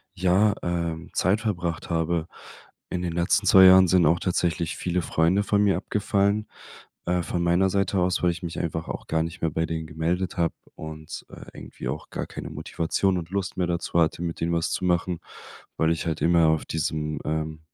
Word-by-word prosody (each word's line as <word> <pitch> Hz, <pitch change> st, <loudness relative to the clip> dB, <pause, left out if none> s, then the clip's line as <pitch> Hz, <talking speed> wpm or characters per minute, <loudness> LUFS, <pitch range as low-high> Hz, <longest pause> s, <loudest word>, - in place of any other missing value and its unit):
ja, 95 Hz, +3 st, +3 dB
ähm, 85 Hz, -1 st, -3 dB
Zeit 100 Hz, +5 st, +2 dB
verbracht 90 Hz, -7 st, -3 dB
habe. 85 Hz, 0 st, 0 dB, 0.6 s
In 90 Hz, -, -3 dB
den 85 Hz, -2 st, -2 dB
letzten 95 Hz, +4 st, +1 dB
2 95 Hz, 0 st, +8 dB
Jahren 95 Hz, 0 st, +8 dB
sind 90 Hz, -1 st, +4 dB
auch 85 Hz, +2 st, +3 dB
tatsächlich 85 Hz, -2 st, -1 dB
viele 90 Hz, 0 st, -1 dB
Freunde 85 Hz, +7 st, +2 dB
von 105 Hz, 0 st, +2 dB
mir 100 Hz, -2 st, +3 dB
abgefallen. 100 Hz, +1 st, 0 dB, 0.6 s
Äh, 90 Hz, 0 st, +1 dB
von 85 Hz, +2 st, -2 dB
meiner 90 Hz, +3 st, +3 dB
Seite 100 Hz, 0 st, 0 dB
aus, 90 Hz, 0 st, 0 dB
weil 90 Hz, -, +4 dB
ich 85 Hz, +2 st, -8 dB
mich 85 Hz, -1 st, -4 dB
einfach 80 Hz, -1 st, -3 dB
auch -, -, -6 dB
gar 80 Hz, 0 st, +1 dB
nicht 85 Hz, +3 st, -7 dB
mehr 80 Hz, -, 0 dB
bei 80 Hz, +2 st, 0 dB
denen 80 Hz, -1 st, -4 dB
gemeldet 85 Hz, +4 st, -2 dB
habe 85 Hz, -1 st, +1 dB, 0.2 s
und, 80 Hz, 0 st, -8 dB
äh, -, -, -11 dB
irgendwie -, -, -7 dB
auch -, -, -5 dB
gar -, -, -3 dB
keine -, -, -7 dB
Motivation 90 Hz, +3 st, -1 dB
und 85 Hz, -1 st, -5 dB
Lust 100 Hz, -1 st, -3 dB
mehr 90 Hz, -1 st, 0 dB
dazu 85 Hz, 0 st, -1 dB
hatte, 80 Hz, +1 st, +1 dB
mit 85 Hz, -1 st, -4 dB
denen 85 Hz, +1 st, 0 dB
was 85 Hz, -1 st, 0 dB
zu 90 Hz, -, -2 dB
machen, 90 Hz, -1 st, 0 dB, 0.6 s
weil 80 Hz, 0 st, +2 dB
ich 85 Hz, -, -2 dB
halt 80 Hz, -1 st, -2 dB
immer 85 Hz, -1 st, +4 dB
auf 80 Hz, -1 st, +1 dB
diesem, 75 Hz, -1 st, -2 dB
ähm 80 Hz, 0 st, -2 dB
85 Hz, 200 wpm, -25 LUFS, 80-95 Hz, 0.6 s, 2